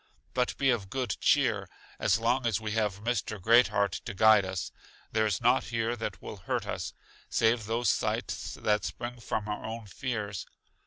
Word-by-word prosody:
But 125 -1 0
be 135 -1 +3
of 105 -6 -1
good 130 +2 -1
cheer, 110 -10 +3 0.3
as - - +3
long 120 +2 +1
as 115 -3 +1
we 110 -1 -4
have 105 -2 -1
Mr. 110 -3 -1
Great 115 +6 +6
heart 100 -1 +1
to 115 - -5
guide 110 -1 +6
us, 95 -2 -4 0.4
there 110 0 +2
is 100 -4 0
nought 120 +3 +4
here 115 +2 -1
that 105 -5 -4
will 105 - -7
hurt 95 - -2
us, - - -4 0.3
save 115 -2 +2
those 115 -1 +2
sights - - -2
that 105 -1 +1
spring 120 0 -5
from 110 -2 -3
our 105 0 -3
own 115 0 -5
fears. 105 -2 -4
110 Hz, 180 wpm, -29 LUFS, 105-120 Hz, 0.4 s, Great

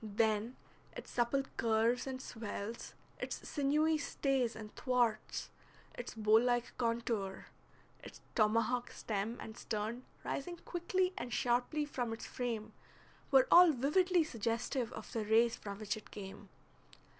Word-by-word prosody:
Then 220 +2 +1 0.4
its - - -8
supple 245 +3 +1
curves 230 +3 +2
and 260 -1 -4
swells, 225 -2 -6 0.2
its - - -5
sinewy 305 +2 +2
stays 270 -5 0
and 215 -1 -9
thwarts, 240 -4 0 0.4
its 245 -2 -7
bow 215 0 +5
like 240 0 0
contour, 230 -5 -1 0.6
its - - -10
tomahawk 230 +3 +2
stem 215 +2 -3
and 220 - -7
stern 220 +3 -3 0.2
rising 345 +5 -3
quickly 365 +1 0
and 245 - -5
sharply 250 +6 +1
from 245 -5 -2
its 225 - -7
frame, 225 -3 -3 0.6
were 265 -2 +6
all 350 -1 +9
vividly 335 +7 +3
suggestive 235 -1 -2
of - - -8
the 225 -3 -1
race 225 +2 +4
from 200 -1 -7
which 215 +1 -2
it 215 - -11
came. 195 -2 -9
235 Hz, 135 wpm, -35 LUFS, 220-265 Hz, 0.6 s, all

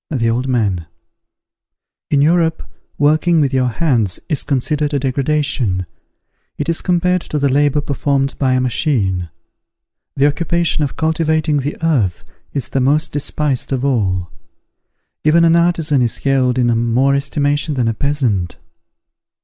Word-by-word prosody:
The 115 -6 0
Old 125 +3 -1
Man. 100 -10 -1 1.2
In 140 -1 +3
Europe, 160 0 +2 0.3
working 155 +3 +3
with 140 -3 +1
your 130 -1 +2
hands 120 - 0
is 150 -5 0
considered 145 +2 -1
a - - +1
degradation; 135 -7 0 0.7
it 145 - -3
is 165 -1 0
compared 180 0 +1
to 150 - -4
the 140 -1 +1
labour 145 +2 +2
performed 140 -1 -1
by 130 -2 +2
a 130 - +2
machine. 110 - 0 0.9
The 135 - +2
occupation 165 +1 0
of 140 - -3
cultivating 160 -1 0
the 145 +2 -3
earth 115 - 0 0.3
is 140 -4 -3
the 135 - -1
most 145 +4 +2
despised 145 -2 -2
of 135 0 -1
all. 95 -9 0 0.9
Even 165 +2 +4
an 165 0 +4
artisan 165 -5 +2
is 120 -2 0
held 130 -2 +1
in 120 -2 +2 0.2
more 135 +2 +3
estimation 145 +1 0
than 125 -3 0
a 115 - +1
peasant. 115 -9 -1
140 Hz, 140 wpm, -17 LUFS, 125-155 Hz, 1.2 s, Even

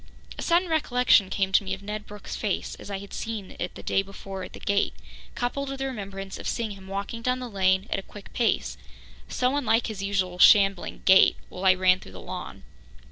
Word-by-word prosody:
A - - -7
sudden 350 +2 +2
recollection 250 - +3
came 195 -1 0
to 195 - +4
me 190 0 -2
of 195 - -15
Ned 210 +1 -5
Brooke's 210 -1 -8
face 205 -4 -2
as - - -10
I 200 - -3
had 200 +1 -10
seen 220 -4 -5
it 180 - -4
the - - -10
day 195 - +2
before 195 0 -8
at 180 - -8
the - - -9
gate, 200 0 0 0.4
coupled 270 +3 -2
with 275 - -4
the 270 - -3
remembrance 195 -6 -6
of - - -5
seeing 230 -2 -2
him 195 -1 -11
walking 200 +4 -4
down 250 +2 +1
the 255 -1 -5
lane 190 -2 +2
at - - 0
a - - -5
quick 200 +1 -13
pace, 70 - 0 0.5
so 255 +2 0
unlike 230 -5 +2
his 215 -4 -5
usual 190 -3 -1
shambling 195 -2 +5
gait, 190 0 +7
while 185 +1 -6
I 185 -1 +7
ran 185 0 +4
through 95 - -13
the 95 - -9
lawn. - - -7
200 Hz, 220 wpm, -26 LUFS, 190-230 Hz, 0.5 s, gait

